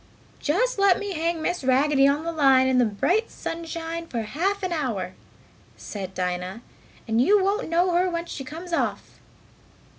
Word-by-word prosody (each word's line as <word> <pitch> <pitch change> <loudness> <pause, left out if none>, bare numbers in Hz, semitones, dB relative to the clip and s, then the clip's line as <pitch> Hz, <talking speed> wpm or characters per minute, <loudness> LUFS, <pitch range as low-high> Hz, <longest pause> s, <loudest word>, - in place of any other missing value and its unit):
"Just 415 +10 0
let 395 -2 +5
me 405 -1 -4
hang 330 0 -1
Miss 350 -3 -1
Raggedy 275 +2 +4
on 285 +3 +1
the 335 - -2
line 270 -5 +4
in 260 -1 +3
the 245 - +5
bright 355 - 0
sunshine 330 0 -5
for 235 -6 -3
half 380 - -1
an 370 - -1
hour," 225 - -2 0.6
said 190 -3 -7
Dinah, 180 +4 -3 0.4
"and 225 +1 +2
you 395 +8 +4
won't 400 +1 0
know 350 +2 +2
her 360 +2 +2
when 340 -1 -3
she 285 - -6
comes 330 +6 -8
off!" - - -2
320 Hz, 170 wpm, -25 LUFS, 255-355 Hz, 0.6 s, let